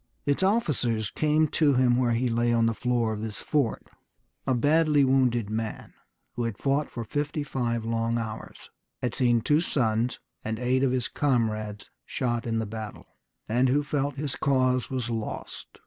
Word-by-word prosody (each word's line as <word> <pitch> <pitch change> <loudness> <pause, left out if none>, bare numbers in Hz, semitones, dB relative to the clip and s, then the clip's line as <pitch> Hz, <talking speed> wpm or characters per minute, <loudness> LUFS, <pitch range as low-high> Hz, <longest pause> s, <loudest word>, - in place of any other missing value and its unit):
Its 145 +3 +1
officers 140 - +1
came 155 +1 +2
to 145 -2 +2
him 125 -1 +4
where 120 -1 +2
he 125 +2 +1
lay 120 0 +1
on 115 -1 +3
the 115 - +2
floor 120 -1 0
of 105 - -5
his 110 -2 -4
fort, 140 -7 0 0.6
a 130 - +3
badly 150 +2 +4
wounded 130 -4 +2
man, 110 0 -4 0.4
who 120 - -2
had 115 -3 -3
fought 140 +2 0
for 120 - -5
fifty 145 +5 -2
five 120 -5 -2
long 115 0 0
hours, 110 -1 -5 0.4
who - - -3
had 120 - -1
seen 120 -2 +2
two 150 +7 +3
sons 115 -6 0 0.2
and 110 0 -2
eight 125 +2 +1
of 135 -2 +2
his 125 -2 0
comrades 110 -7 -1
shot 120 -2 -2
in 115 -1 0
the 110 - -1
battle, 110 0 -8 0.3
and 125 +4 +2
who 145 +3 +2
felt 145 -1 -1
that 140 - -5
his 145 -4 -3
cause 130 -2 +1
was 125 -3 -2
lost. 110 -2 -6
125 Hz, 180 wpm, -27 LUFS, 115-140 Hz, 0.6 s, him